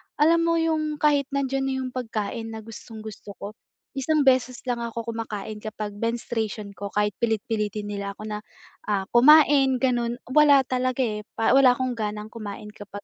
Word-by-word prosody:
alam 325 Hz, +3 st, +4 dB
mo 335 Hz, 0 st, +2 dB
yung 315 Hz, -2 st, 0 dB
kahit 290 Hz, -2 st, +2 dB
nandiyan 270 Hz, -1 st, 0 dB
na 270 Hz, -, -1 dB
yung 255 Hz, -, -5 dB
pagkain 225 Hz, -2 st, -4 dB
na 220 Hz, -, -8 dB
gustong-gusto 220 Hz, -2 st, -10 dB
ko, 200 Hz, -, -7 dB, 0.4 s
isang 290 Hz, +2 st, +1 dB
beses 255 Hz, -2 st, +2 dB
lang 245 Hz, -2 st, -1 dB
ako 230 Hz, 0 st, -4 dB
kumakain 215 Hz, -1 st, -5 dB
kapag 215 Hz, -1 st, -6 dB
menstruation 225 Hz, -2 st, -3 dB
ko, 200 Hz, +1 st, -6 dB
kahit 210 Hz, 0 st, +2 dB
pilit-pilitin 215 Hz, -2 st, -1 dB
nila 200 Hz, -1 st, -4 dB
ako 215 Hz, -, -10 dB
na, 210 Hz, -1 st, -4 dB, 0.5 s
ah, 200 Hz, -2 st, +1 dB
kumain 275 Hz, +1 st, +6 dB
ganun 240 Hz, -2 st, +1 dB, 0.2 s
wala 285 Hz, -1 st, +6 dB
talaga 255 Hz, 0 st, 0 dB
eh, 210 Hz, -3 st, -2 dB
pa 225 Hz, -, +2 dB
wala 260 Hz, -2 st, +6 dB
akong 255 Hz, 0 st, -1 dB
ganang 210 Hz, -1 st, -4 dB
kumain 210 Hz, -2 st, -7 dB
kapag 205 Hz, -1 st, -10 dB
230 Hz, 165 wpm, -25 LUFS, 210-265 Hz, 0.5 s, kumain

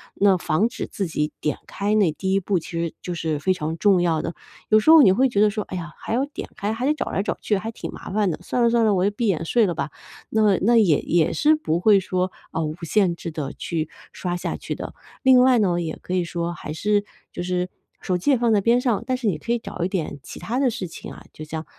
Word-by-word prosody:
那 200 Hz, -1 st, +4 dB
防 175 Hz, +6 st, +1 dB
止 -, -, -5 dB
自 195 Hz, -, -3 dB
己 150 Hz, -2 st, -2 dB
点 150 Hz, -, -1 dB
开 205 Hz, +2 st, -1 dB
那 200 Hz, -6 st, +3 dB
第 190 Hz, +5 st, -2 dB
1 195 Hz, -, +3 dB
步， 195 Hz, 0 st, 0 dB
其 -, -, -12 dB
实 170 Hz, -1 st, -2 dB
就 180 Hz, -, -4 dB
是 160 Hz, -3 st, -2 dB
非 185 Hz, +5 st, +2 dB
常 160 Hz, -2 st, -4 dB
重 190 Hz, 0 st, +4 dB
要 165 Hz, -3 st, +1 dB
的。 -, -, -4 dB, 0.4 s
有 215 Hz, -, +6 dB
时 215 Hz, -, +1 dB
候 320 Hz, -1 st, +10 dB
你 200 Hz, -, +7 dB
会 260 Hz, +7 st, +3 dB
觉 205 Hz, -4 st, +1 dB
得 210 Hz, -, +5 dB
说， 210 Hz, 0 st, -3 dB
哎 185 Hz, -, -6 dB
呀， 170 Hz, -1 st, -7 dB
还 -, -, -5 dB
要 255 Hz, +4 st, +1 dB
点 285 Hz, -, -8 dB
开， 205 Hz, +2 st, -2 dB
还 240 Hz, +3 st, -3 dB
得 295 Hz, -, +3 dB
找 -, -, -4 dB
来 -, -, 0 dB
找 205 Hz, -, -2 dB
去， 210 Hz, -, +1 dB
还 220 Hz, +4 st, -4 dB
挺 -, -, -7 dB
麻 -, -, -9 dB
烦 205 Hz, 0 st, +1 dB
的， -, -, -5 dB
算 240 Hz, +7 st, -1 dB
了 235 Hz, -, +5 dB
算 235 Hz, 0 st, +3 dB
了， 210 Hz, -, +3 dB
我 180 Hz, -, +1 dB
就 205 Hz, -, +2 dB
闭 225 Hz, +3 st, -2 dB
眼 165 Hz, -5 st, 0 dB
睡 230 Hz, +6 st, +3 dB
了 175 Hz, -4 st, -2 dB
吧， 140 Hz, +1 st, -3 dB, 0.4 s
那 215 Hz, -3 st, +3 dB
那 235 Hz, +4 st, +4 dB
也 180 Hz, -10 st, +4 dB
也 170 Hz, -1 st, +1 dB
是 310 Hz, +1 st, +4 dB
不 170 Hz, -, -1 dB
会 200 Hz, +1 st, +5 dB
说， 185 Hz, 0 st, -1 dB, 0.2 s
啊， 165 Hz, -, -2 dB
无 155 Hz, 0 st, -2 dB
限 180 Hz, +1 st, +2 dB
制 170 Hz, -1 st, -6 dB
地 145 Hz, -3 st, -5 dB
去 160 Hz, -2 st, -3 dB, 0.2 s
刷 175 Hz, -1 st, -3 dB
下 -, -, -3 dB
去 -, -, -5 dB
的。 -, -, -7 dB, 0.3 s
另 260 Hz, -2 st, +7 dB
外 255 Hz, -1 st, +5 dB
呢， 175 Hz, -4 st, +1 dB
也 160 Hz, -1 st, -4 dB
可 180 Hz, -, -5 dB
以 180 Hz, -1 st, +2 dB
说 170 Hz, 0 st, -3 dB
还 150 Hz, -, -7 dB
是 205 Hz, +5 st, +1 dB, 0.3 s
就 175 Hz, -, -4 dB
是， 180 Hz, 0 st, -1 dB, 0.3 s
手 180 Hz, -1 st, 0 dB
机 280 Hz, +11 st, +1 dB
也 265 Hz, -, +4 dB
放 235 Hz, -1 st, +2 dB
在 205 Hz, -, +3 dB
边 235 Hz, +4 st, +3 dB
上， 235 Hz, -4 st, 0 dB
但 255 Hz, -1 st, 0 dB
是 240 Hz, -4 st, -2 dB
你 180 Hz, -, +1 dB
可 230 Hz, -, -5 dB
以 240 Hz, -, +1 dB
找 180 Hz, -, -5 dB
一 -, -, +1 dB
点 170 Hz, -6 st, -3 dB
其 -, -, -9 dB
他 235 Hz, +3 st, -3 dB
的 270 Hz, -2 st, +3 dB
事 195 Hz, -5 st, -4 dB
情 165 Hz, -, -9 dB
啊， -, -, -12 dB
就 155 Hz, -, -9 dB
像 160 Hz, +1 st, -6 dB
190 Hz, 295 characters per minute, -23 LUFS, 170-220 Hz, 0.4 s, 候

